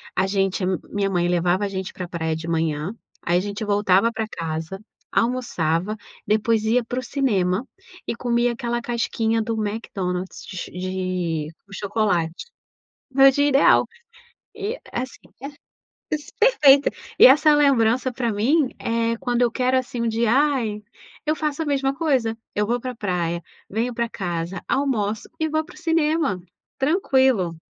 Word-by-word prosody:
a 190 Hz, +1 st, +2 dB
gente 195 Hz, -1 st, 0 dB
a -, -, +1 dB, 0.2 s
minha 200 Hz, -1 st, 0 dB
mãe 175 Hz, -2 st, +1 dB
levava 175 Hz, +2 st, +1 dB
a -, -, 0 dB
gente 190 Hz, -1 st, -5 dB
pra 180 Hz, -1 st, -6 dB
praia 160 Hz, -2 st, -2 dB
de 160 Hz, +1 st, -6 dB
manhã, 160 Hz, +2 st, -1 dB, 0.3 s
aí 175 Hz, +1 st, +1 dB
a -, -, +2 dB
gente 205 Hz, +2 st, -4 dB
voltava 205 Hz, +1 st, +3 dB
pra 225 Hz, -1 st, -2 dB
casa, 165 Hz, 0 st, -5 dB, 0.3 s
almoçava, 210 Hz, -6 st, 0 dB, 0.3 s
depois 215 Hz, +1 st, +2 dB
ia 235 Hz, +3 st, +2 dB
para 245 Hz, +2 st, -3 dB
o -, -, -6 dB
cinema 215 Hz, -6 st, 0 dB, 0.4 s
e -, -, -1 dB
comia 240 Hz, 0 st, +1 dB
aquela 240 Hz, 0 st, -2 dB
casquinha 230 Hz, -1 st, 0 dB
do 225 Hz, +1 st, -2 dB
Mcdonald's 195 Hz, -4 st, -3 dB
de 185 Hz, -, -8 dB
ch -, -, -4 dB
de 180 Hz, -4 st, -2 dB, 0.2 s
o 195 Hz, -, -14 dB
chocolate. 195 Hz, -5 st, -1 dB, 0.7 s
Meu 270 Hz, +1 st, +7 dB
dia 285 Hz, +2 st, +2 dB
ideal. 275 Hz, 0 st, +5 dB, 0.7 s
E 435 Hz, +5 st, -3 dB
assim, 255 Hz, +2 st, -4 dB, 0.2 s
é, 275 Hz, -, -5 dB, 0.7 s
es 300 Hz, -1 st, -6 dB
perfeito. 290 Hz, -, +6 dB, 0.3 s
E -, -, +10 dB
essa 300 Hz, +4 st, +6 dB
lembrança, 260 Hz, -3 st, +3 dB
pra 240 Hz, -2 st, -1 dB
mim, 260 Hz, +8 st, +2 dB
eh, 230 Hz, 0 st, 0 dB
quando 245 Hz, -1 st, 0 dB
eu 240 Hz, -, +3 dB
quero 255 Hz, +2 st, +1 dB
assim 245 Hz, -2 st, -3 dB
um 235 Hz, -, +1 dB
dia, 225 Hz, 0 st, +1 dB
ai 260 Hz, -6 st, +1 dB, 0.5 s
eu 305 Hz, -, +2 dB
faço 305 Hz, 0 st, -2 dB
a -, -, -2 dB
mesma 270 Hz, -2 st, +1 dB
coisa: 265 Hz, -8 st, 0 dB, 0.2 s
eu 210 Hz, 0 st, +1 dB
vou 240 Hz, +1 st, +1 dB
pra 255 Hz, +1 st, -5 dB
praia, 175 Hz, -5 st, -2 dB, 0.3 s
venho 230 Hz, +4 st, -1 dB
pra 235 Hz, 0 st, -1 dB
casa, 175 Hz, -3 st, -4 dB
almoço 220 Hz, -7 st, 0 dB
e 315 Hz, -, +1 dB
vou 315 Hz, +1 st, 0 dB
para -, -, -15 dB
o -, -, -14 dB
cinema, 320 Hz, -, +1 dB, 0.4 s
tranquilo. 265 Hz, -, +2 dB
225 Hz, 160 wpm, -23 LUFS, 185-260 Hz, 0.7 s, E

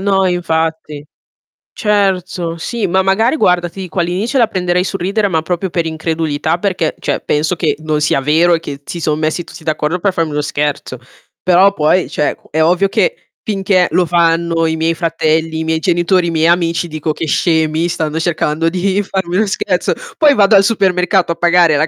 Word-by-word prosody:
no, 195 Hz, -1 st, +1 dB
infatti. 160 Hz, -4 st, -2 dB, 0.7 s
Certo, 185 Hz, -5 st, -1 dB
sì, 215 Hz, +4 st, -3 dB
ma 190 Hz, +2 st, +2 dB
magari 220 Hz, +8 st, +2 dB
guarda, 180 Hz, -, +2 dB
ti 190 Hz, +3 st, -9 dB
dico, 180 Hz, -1 st, -5 dB
all'inizio 190 Hz, +10 st, -1 dB
la 230 Hz, -, +4 dB
prenderei 180 Hz, -3 st, 0 dB
sul 195 Hz, 0 st, -4 dB
ridere 200 Hz, +3 st, 0 dB
ma 160 Hz, -4 st, 0 dB
proprio 180 Hz, +2 st, -3 dB
per 170 Hz, -1 st, -1 dB
incredulità 160 Hz, 0 st, -2 dB
perché, 180 Hz, -5 st, -1 dB
cioè, -, -, -2 dB
penso 155 Hz, +4 st, 0 dB
che 155 Hz, -3 st, 0 dB
non 155 Hz, -1 st, -1 dB
sia 150 Hz, -2 st, +1 dB
vero 160 Hz, +5 st, +3 dB
e 165 Hz, -, +2 dB
che 145 Hz, -3 st, -7 dB
si 170 Hz, -, -6 dB
son 155 Hz, 0 st, -1 dB
messi 155 Hz, +2 st, -1 dB
tutti 160 Hz, -, -13 dB
d'accordo 155 Hz, +2 st, -1 dB
per 195 Hz, +1 st, 0 dB
farmi 165 Hz, -3 st, -1 dB
uno 150 Hz, -, -2 dB
scherzo. 145 Hz, -3 st, -3 dB, 0.5 s
Però 185 Hz, +2 st, +4 dB
poi 165 Hz, +2 st, +1 dB
cioè, 150 Hz, -, -1 dB
qu -, -, -25 dB
è 160 Hz, -, 0 dB
ovvio 180 Hz, +4 st, +3 dB
che -, -, 0 dB, 0.3 s
finché 195 Hz, -3 st, +1 dB
lo 180 Hz, -, +2 dB
fanno 165 Hz, 0 st, +1 dB
i 160 Hz, -, 0 dB
miei 165 Hz, +1 st, +1 dB
fratelli, 160 Hz, -1 st, -1 dB
i -, -, -2 dB
miei 160 Hz, 0 st, 0 dB
genitori, 175 Hz, +1 st, +1 dB
i 170 Hz, -, -1 dB
miei 160 Hz, 0 st, +2 dB
amici 170 Hz, 0 st, +1 dB
dico: 155 Hz, 0 st, -3 dB
"Che 160 Hz, -, -4 dB
scemi, 160 Hz, +1 st, +1 dB
stanno 160 Hz, -2 st, -2 dB
cercando 165 Hz, -1 st, 0 dB
di 190 Hz, +3 st, 0 dB
farmi 190 Hz, -2 st, -3 dB
uno 220 Hz, -, +2 dB
scherzo." 420 Hz, -, -1 dB, 0.3 s
Poi 300 Hz, -4 st, +5 dB
vado 205 Hz, 0 st, +4 dB
al 195 Hz, -, +6 dB
supermercato 190 Hz, -3 st, +1 dB
a -, -, -16 dB
pagare 175 Hz, -2 st, +3 dB
la 155 Hz, +2 st, +1 dB
170 Hz, 195 wpm, -15 LUFS, 160-190 Hz, 0.7 s, al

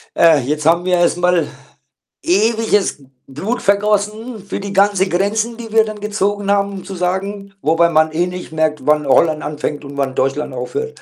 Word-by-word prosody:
äh, 165 Hz, -2 st, +6 dB
jetzt 150 Hz, +4 st, -3 dB
haben 170 Hz, +2 st, +3 dB
wir 185 Hz, -, +1 dB
erst 175 Hz, 0 st, +2 dB
mal 175 Hz, -2 st, +2 dB, 0.8 s
ewiges 210 Hz, -1 st, +1 dB
B 140 Hz, -, -19 dB, 0.2 s
Blut 190 Hz, -, -4 dB
vergossen 210 Hz, +3 st, 0 dB
für 205 Hz, -, -4 dB
die 200 Hz, 0 st, -6 dB
ganze 200 Hz, -1 st, +3 dB
Grenzen, 215 Hz, +6 st, 0 dB
die 230 Hz, -2 st, -9 dB
wir 220 Hz, 0 st, +4 dB
dann 215 Hz, -1 st, -7 dB
gezogen 205 Hz, -1 st, -1 dB
haben, 200 Hz, 0 st, +1 dB
um 195 Hz, -, -7 dB
zu 195 Hz, -, -7 dB
sagen 195 Hz, +2 st, -3 dB
wobei 165 Hz, +2 st, +3 dB
man 155 Hz, -1 st, +3 dB
eh 170 Hz, +3 st, 0 dB
nicht 180 Hz, -1 st, -7 dB
merkt, 155 Hz, -3 st, -1 dB
wann 150 Hz, -1 st, +2 dB
Holland 155 Hz, +3 st, +3 dB
anfängt 150 Hz, 0 st, -4 dB
und 140 Hz, 0 st, -9 dB
wann 135 Hz, -2 st, -1 dB
Deutschland 135 Hz, +1 st, -1 dB
aufhört, 435 Hz, -, -5 dB
185 Hz, 185 wpm, -17 LUFS, 155-205 Hz, 0.8 s, äh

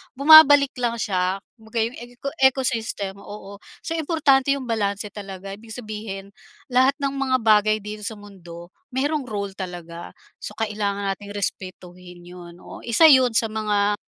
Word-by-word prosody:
bumabalik 290 Hz, -1 st, +8 dB
lang 235 Hz, -1 st, -1 dB
siya. 185 Hz, -3 st, -1 dB, 0.2 s
Kumbaga 220 Hz, +1 st, -10 dB
'yong 230 Hz, +2 st, -5 dB
eco 245 Hz, +3 st, -7 dB
ecosystem, 230 Hz, -7 st, 0 dB
oo. 200 Hz, 0 st, -11 dB, 0.2 s
So -, -, -6 dB
importante 285 Hz, -4 st, +2 dB
'yong 275 Hz, -, -6 dB
balanse 210 Hz, -3 st, -2 dB
talaga, 195 Hz, -1 st, -8 dB
ibig 220 Hz, +2 st, -10 dB
sabihin 210 Hz, -4 st, -7 dB, 0.4 s
lahat 260 Hz, +2 st, +3 dB
ng 280 Hz, -2 st, -2 dB
mga 270 Hz, -2 st, 0 dB
bagay 215 Hz, -1 st, +4 dB
dito 210 Hz, 0 st, -7 dB
sa 220 Hz, -, -5 dB
mundo 175 Hz, -4 st, -13 dB, 0.2 s
mayroong 285 Hz, +3 st, -1 dB
role 200 Hz, -2 st, -4 dB
talaga. 175 Hz, -3 st, -8 dB, 0.3 s
So, -, -, -7 dB
kailangan 205 Hz, -2 st, -2 dB
nating 205 Hz, 0 st, -11 dB
respetuhin 180 Hz, -3 st, -7 dB
'yon, 175 Hz, -1 st, -12 dB
oo, -, -, -11 dB
isa 235 Hz, +8 st, +3 dB
'yon 260 Hz, -4 st, +6 dB
sa 225 Hz, -, +2 dB
mga, 210 Hz, -1 st, 0 dB
215 Hz, 150 wpm, -22 LUFS, 195-255 Hz, 0.4 s, bumabalik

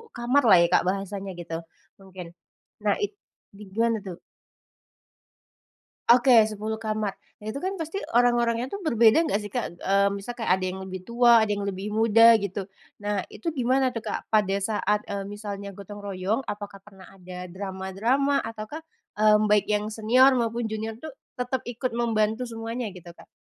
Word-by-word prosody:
kamar 250 Hz, +4 st, +2 dB
lah 185 Hz, -, +8 dB
ya, -, -, +3 dB
Kak, -, -, +4 dB
bahasanya 195 Hz, 0 st, -3 dB
gitu 165 Hz, -1 st, -5 dB, 0.4 s
mungkin. 185 Hz, -3 st, -10 dB, 0.5 s
Nah, -, -, +1 dB
itu 410 Hz, 0 st, -3 dB, 0.6 s
gimana 230 Hz, -1 st, +1 dB
tuh? 185 Hz, -3 st, -9 dB, 1.9 s
Oke, 240 Hz, -2 st, +6 dB
10 215 Hz, +1 st, -4 dB
kamar. 215 Hz, -2 st, -2 dB, 0.3 s
Nah, 210 Hz, -, -13 dB
itu 280 Hz, -, -5 dB
kan 380 Hz, +3 st, -3 dB
pasti 325 Hz, +5 st, -4 dB, 0.2 s
orang-orangnya 240 Hz, 0 st, +2 dB
tuh 400 Hz, -, -4 dB
berbeda 235 Hz, +4 st, +4 dB
enggak 210 Hz, -, 0 dB
sih, 205 Hz, -, -8 dB
Kak? 245 Hz, -3 st, -2 dB, 0.2 s
Mmm, 200 Hz, +1 st, +2 dB
misal 220 Hz, +5 st, -6 dB
kayak 225 Hz, -5 st, -1 dB
ada 185 Hz, 0 st, -4 dB
yang 190 Hz, +1 st, -6 dB
lebih 185 Hz, -1 st, -7 dB
tua, 235 Hz, 0 st, +5 dB
ada 210 Hz, -, -1 dB
yang 200 Hz, -1 st, -2 dB
lebih 195 Hz, +1 st, -4 dB
muda 225 Hz, +1 st, +6 dB
gitu. 200 Hz, 0 st, -4 dB, 0.4 s
Nah, 205 Hz, -2 st, -1 dB
itu 225 Hz, -, -10 dB
gimana 260 Hz, -1 st, +1 dB
tuh, 230 Hz, -, -4 dB
Kak, -, -, -4 dB
pada 205 Hz, -3 st, +3 dB
saat, 210 Hz, 0 st, 0 dB
eee, 200 Hz, -1 st, -4 dB
misalnya 205 Hz, -1 st, -6 dB
gotong 205 Hz, +1 st, -10 dB
royong? 200 Hz, +4 st, -2 dB
Apakah 205 Hz, -1 st, -6 dB
pernah 195 Hz, -3 st, -15 dB
ada 180 Hz, -1 st, -9 dB
drama-drama? 200 Hz, +9 st, -1 dB
Ataukah, 225 Hz, +7 st, -7 dB, 0.4 s
mmm, 215 Hz, 0 st, +5 dB
baik 210 Hz, -1 st, +4 dB
yang 210 Hz, 0 st, +1 dB
senior 250 Hz, +5 st, +5 dB
maupun 235 Hz, +1 st, -1 dB
junior 220 Hz, 0 st, -4 dB
tuh 315 Hz, -, -6 dB, 0.3 s
tetap 250 Hz, +1 st, -2 dB
ikut 245 Hz, +1 st, -3 dB
membantu 220 Hz, 0 st, 0 dB
semuanya 230 Hz, +1 st, -5 dB
gitu, 175 Hz, -1 st, -11 dB
Kak? -, -, -16 dB
215 Hz, 165 wpm, -25 LUFS, 200-240 Hz, 1.9 s, lah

